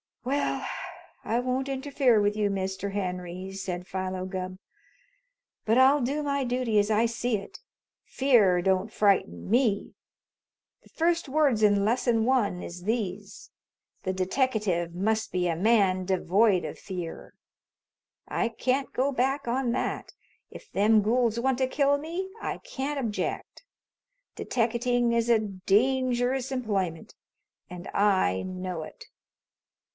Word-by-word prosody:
"Well, 275 +3 -1 0.6
I 230 +2 0
won't 255 +2 -1
interfere 270 -3 +2
with 205 0 +1
you, 210 -1 +1
Mr. 195 0 -3
Henry," 180 -1 -4
said 180 -2 -5
Philo 185 0 -4
Gubb. 185 -1 -5 1.1
"But 225 +2 +2
I'll 270 +3 +5
do 280 +5 -1
my 280 -1 0
dooty 245 -3 +1
as 205 +1 +1
I 220 +2 +3
see 235 0 -1
it. 195 - -10 0.5
Fear 210 -10 +3
don't 190 +3 +1
frighten 190 - +1
me. 225 -3 +1 0.9
The - - -22
first 335 -2 0
words 275 -6 +2
in 205 -1 +4
Lesson 230 0 +2
One 230 -8 +1
is 175 +1 -8
these: 205 -2 -3 0.5
'The 185 - -1
deteckative 190 -4 0
must 220 +4 0
be 180 -1 0
a 165 - 0
man 190 -1 +2
devoid 190 +1 +2
of - - -7
fear.' 180 -4 -7 0.9
I 235 - 0
can't 260 +4 -1
go 270 +3 +1
back 270 +1 0
on 245 0 0
that. - - -3 0.4
If - - -13
them 215 +2 +4
gools 230 +1 +1
want 260 +1 +1
to 260 - +2
kill 280 +1 +2
me, 340 +6 -5
I - - -3
can't 280 +2 -4
object. 230 - -4 0.7
Deteckating 240 0 0
is 235 0 +1
a 230 -2 +5
dangerous 245 +6 +1
employment, 195 -10 -2 0.6
and 180 0 -8
I 190 - +2
know 185 -2 -5
it." - - -10
220 Hz, 130 wpm, -27 LUFS, 190-255 Hz, 1.1 s, I'll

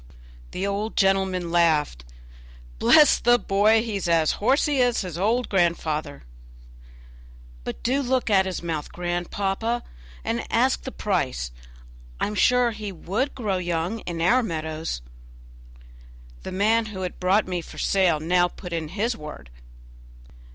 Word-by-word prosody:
The 190 - -3
old 200 +2 -2
gentleman 190 -3 +1
laughed. 155 - +2 0.7
"Bless 300 -3 +6
the 240 0 +4
boy! 215 +1 +3
he 220 -4 -3
is 185 -3 -3
as 165 -2 +3
horsey 275 +4 +2
as 245 -1 +2
his 180 -4 -6
old 225 +7 +1
grandfather." 160 -5 -1 1.4
"But - - -6
do 265 +4 +1
look 260 -1 0
at 190 -3 +3
his 185 -2 -4
mouth, 160 -3 -4
grandpapa, 195 +6 -2 0.4
and - - -2
ask - - +2
the - - -4
price; - - -2 0.7
I - - +1
am 210 - -4
sure 250 +3 +3
he 210 -2 -6
would 200 - -3
grow 210 -7 -1
young 175 +4 -2
in 170 -5 -5
our 245 +9 +4
meadows." 160 - -4 1.4
The - - -7
man 220 +4 +2
who 195 -3 -7
had 180 -1 -5
brought 190 +3 +2
me 180 -2 -2
for - - -13
sale 185 -5 +2
now 175 +3 +2
put 180 0 -9
in 165 -2 -2
his 215 +8 -1
word. 150 - -10
190 Hz, 145 wpm, -24 LUFS, 170-220 Hz, 1.4 s, Bless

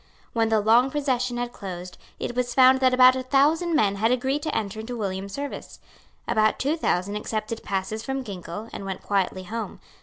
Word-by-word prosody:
When 225 -1 +1
the 220 -1 +3
long 230 +5 +4
procession 255 -4 -1
had 240 0 -3
closed, 180 -2 -8 0.2
it 240 - -4
was 245 -1 -1
found 260 0 +6
that 260 -1 +4
about 255 0 +7
a 260 - -2
thousand 300 +6 +2
men 200 -9 +2
had 225 +3 +2
agreed 265 +3 0
to 310 0 -2
enter 215 0 -3
into 240 +2 -5
William's 195 -2 -3
service. 285 0 -6 0.5
About 215 0 +2
two 285 +4 0
thousand 200 - -1
accepted 215 +1 -4
passes 200 +3 -3
from 270 0 -3
Ginkell, 200 0 -7
and - - -6
went 190 -1 -5
quietly 190 -2 0
home. 225 +4 -5
230 Hz, 190 wpm, -25 LUFS, 200-260 Hz, 0.5 s, about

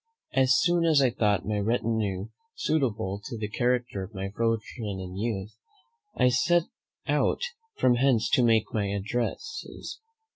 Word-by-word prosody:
As 130 0 +4
soon 175 0 +3
as 160 -3 +5
I 130 -3 +4
thought 105 -3 +1
my 105 -1 -1
retinue 110 -3 -1 0.3
suitable 110 -10 -1
to 120 0 -6
the 105 -1 -3
character 120 -2 0
of 95 +3 -8
my 95 +1 -4
fortune 110 -3 -2
and 90 -1 -7
youth, 105 -1 -3 0.6
I 125 - +5
set 170 +7 +3 0.4
out - - +1 0.4
from 125 -1 +4
hence 120 -4 +3
to - - +4
make 115 -2 +3
my 105 -2 0
addresses. 120 - -4
115 Hz, 145 wpm, -27 LUFS, 100-125 Hz, 0.6 s, as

